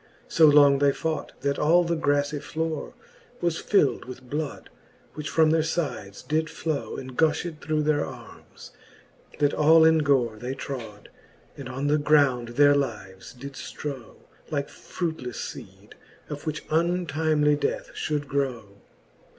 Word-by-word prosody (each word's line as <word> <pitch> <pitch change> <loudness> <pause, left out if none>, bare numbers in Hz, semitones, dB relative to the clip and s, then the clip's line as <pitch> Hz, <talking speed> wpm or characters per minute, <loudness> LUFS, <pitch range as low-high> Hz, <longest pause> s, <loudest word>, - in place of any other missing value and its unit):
So 160 -1 +5
long 145 -2 +6
they 140 0 +4
fought, 160 +2 -3
that 140 0 -1
all 170 +4 +4
the 170 0 -1
graflie 145 -1 0
flore 160 0 -4 0.4
Was 170 -2 -1
fild 195 -9 +2
with 130 0 -10
bloud, 150 +2 -5 0.4
which 150 0 -5
from 160 -1 +4
their 160 0 +3
fides 155 - -3
did 160 +1 -1
flow, 155 -3 -3
And 130 -1 -8
gufhed 160 +1 0
through 155 0 0
their 150 -1 +2
armes, - - -11 0.7
that 145 -1 +2
all 160 +2 +6
in 160 0 +5
gore 130 -7 +1
They 125 +4 -5
trode, 115 -7 -7 0.5
and - - -8
on 135 +2 -4
the 150 +1 +2
ground 140 -5 +3
their 145 0 +7
lives 100 -9 -3
did 140 +3 -9
ftrow. 135 -3 -7 0.3
Like 145 -3 -2
fruitlefle 160 -8 -5
feede, - - -9 0.4
of 150 +2 -7
which 155 0 -3
untimely 155 -3 +2
death 145 - -2
Ihould 150 -1 -2
grow. 125 -8 -3
145 Hz, 145 wpm, -26 LUFS, 135-155 Hz, 0.7 s, their